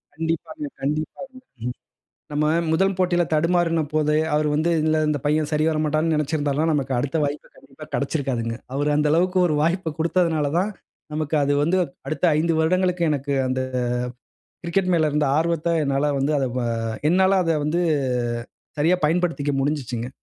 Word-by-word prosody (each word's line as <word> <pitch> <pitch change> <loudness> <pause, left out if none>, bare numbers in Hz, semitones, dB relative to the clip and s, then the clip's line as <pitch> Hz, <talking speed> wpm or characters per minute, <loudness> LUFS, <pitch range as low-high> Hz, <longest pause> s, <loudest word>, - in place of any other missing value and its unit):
கண்டிப்பாங்க, 165 - -3 0.2
கண்டிப்பாங்க. 155 - -3 0.3
ம். 125 0 -3 0.6
நம்ம 150 +1 0 0.3
முதல் 190 +4 +2
போட்டியில 175 -1 +2
தடுமாறினபோது, 155 -2 +1 0.2
அவரு 150 0 +2
வந்து 160 +3 +1
"இந்த 155 0 +2
இந்த 150 -1 0
பையன் 150 +1 +1
சரி 150 0 +1
வரமாட்டான்னு" 155 +1 +1
நெனைச்சிருந்தாலும் 150 0 0
நமக்கு 135 -2 -1
அடுத்த 145 +5 -1
வாய்ப்பு 145 +1 -5
கண்டிப்பா 140 +3 -13
கெடைச்சிருக்காதுங்க. 130 -6 -1 0.2
அவரு 145 +2 0
அந்த 150 0 +2
அளவுக்கு 180 +4 +2
ஒரு 155 - 0
வாய்ப்பு 170 +1 0
குடுத்ததனால 165 -3 +1
தான், 200 +4 0 0.4
நமக்கு 155 0 -1
அது 140 +1 +1
வந்து 170 +5 +2 0.3
அடுத்த 155 - -4
5 165 +2 +1
வருடங்களுக்கு 180 +2 +1
எனக்கு 140 -1 -2
அந்த 130 0 -1 1.0
கிரிக்கெட் 185 +2 0
மேல 155 -2 +2
இருந்த 150 0 +1
ஆர்வத்த, 165 0 0
என்னால 140 +1 +1
வந்து 140 +3 +1
அத 135 - +1
வ - - 0 0.5
என்னால 190 +2 +4
அத 165 - +2
வந்து 160 +3 0 1.0
சரியா 165 +5 +4
பயன்படுத்திக்க 165 -3 0
முடிஞ்சுச்சுங்க. 130 -5 -2
155 Hz, 145 wpm, -23 LUFS, 145-170 Hz, 1.0 s, என்னால